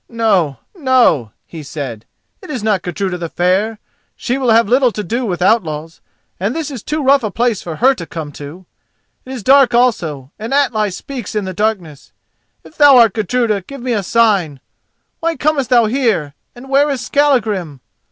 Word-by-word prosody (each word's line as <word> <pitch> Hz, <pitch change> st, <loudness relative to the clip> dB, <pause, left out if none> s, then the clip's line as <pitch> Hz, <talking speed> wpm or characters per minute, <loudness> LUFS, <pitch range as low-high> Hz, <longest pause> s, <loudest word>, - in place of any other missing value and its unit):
"No, 200 Hz, -, +1 dB, 0.2 s
no," 250 Hz, -, +2 dB
he 165 Hz, -, -9 dB
said, 135 Hz, -6 st, -7 dB, 0.4 s
"it -, -, -12 dB
is 255 Hz, -8 st, -4 dB
not 210 Hz, -4 st, +1 dB
Gudruda 180 Hz, +1 st, -3 dB
the 170 Hz, -1 st, -5 dB
Fair. 190 Hz, +7 st, 0 dB, 0.4 s
She 250 Hz, -, -2 dB
will 255 Hz, -3 st, 0 dB
have 225 Hz, -1 st, +4 dB
little 250 Hz, +2 st, +3 dB
to 210 Hz, -, -5 dB
do 235 Hz, +6 st, -2 dB
with 180 Hz, -2 st, -2 dB
outlaws, 165 Hz, -6 st, 0 dB, 0.4 s
and 200 Hz, +7 st, -2 dB
this 320 Hz, -3 st, -4 dB
is 255 Hz, -6 st, -7 dB
too 300 Hz, +4 st, -3 dB
rough 275 Hz, +1 st, +4 dB
a 215 Hz, -, -1 dB
place 230 Hz, 0 st, -1 dB
for 165 Hz, -2 st, -6 dB
her 260 Hz, -, +4 dB
to 170 Hz, -10 st, -8 dB
come 155 Hz, -3 st, -6 dB
to. 150 Hz, +6 st, -10 dB, 0.6 s
It 260 Hz, -, -9 dB
is 250 Hz, -5 st, -6 dB
dark 265 Hz, -1 st, +5 dB
also 160 Hz, -, 0 dB
and 225 Hz, +5 st, -3 dB
Atli 220 Hz, -7 st, +1 dB
speaks 240 Hz, +4 st, -7 dB
in 210 Hz, -2 st, -1 dB
the 185 Hz, -, -5 dB
darkness. 185 Hz, -8 st, -3 dB, 0.5 s
If 315 Hz, -, -17 dB
thou 285 Hz, -3 st, +7 dB
art 230 Hz, -5 st, +5 dB
Gudruda, 220 Hz, -1 st, 0 dB
give 275 Hz, +8 st, -10 dB
me 250 Hz, 0 st, -2 dB
a 210 Hz, -, 0 dB
sign. 195 Hz, -, +1 dB, 0.6 s
Why 330 Hz, 0 st, -1 dB
comest 295 Hz, -4 st, 0 dB
thou 240 Hz, -3 st, +4 dB
here 215 Hz, -, 0 dB, 0.2 s
and 245 Hz, +2 st, -12 dB
where 280 Hz, +2 st, +3 dB
is 275 Hz, -3 st, -2 dB
Skallagrim? 220 Hz, -, 0 dB
220 Hz, 185 wpm, -16 LUFS, 175-255 Hz, 0.6 s, thou